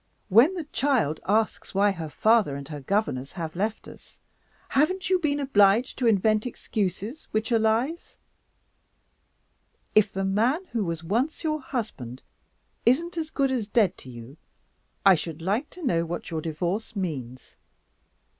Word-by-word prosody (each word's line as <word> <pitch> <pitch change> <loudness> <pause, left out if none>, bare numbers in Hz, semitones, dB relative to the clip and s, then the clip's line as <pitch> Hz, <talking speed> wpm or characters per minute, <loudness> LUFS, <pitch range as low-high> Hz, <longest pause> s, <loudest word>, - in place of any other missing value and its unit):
When 240 - +6
the 345 - -3
child 260 - 0
asks 215 -1 0
why 200 +1 +4
her 165 -5 -5
father 215 -4 +3
and 140 -1 -7
her 150 -2 -6
governess 140 -7 -1
have 165 -3 -5
left 215 +4 -2
us, - - -15 0.5
haven't 365 +7 +1
you 370 - +4
been 290 -3 0
obliged 225 -3 +3
to 245 - +2
invent 215 +1 +3
excuses 210 - -4
which 215 +3 -1
are 230 - +4
lies? 230 +10 0 1.8
If 215 -1 +4
the 195 0 -2
man 235 - +1
who 225 -3 0
was 170 -2 -3
once 240 - -1
your 310 -1 -1
husband 205 - -5 0.6
isn't 330 +9 +2
as 320 -2 -3
good 275 -3 0
as 240 -6 -1
dead 205 -5 +2
to 130 - -12
you, 120 +4 -11 0.7
I 195 - +9
should 160 -1 -3
like 205 - -1
to 360 - -12
know 170 -8 +2
what 170 +1 -5
your 160 -1 -2
Divorce 175 +8 -3
means! 135 - -5
215 Hz, 155 wpm, -26 LUFS, 170-260 Hz, 1.8 s, I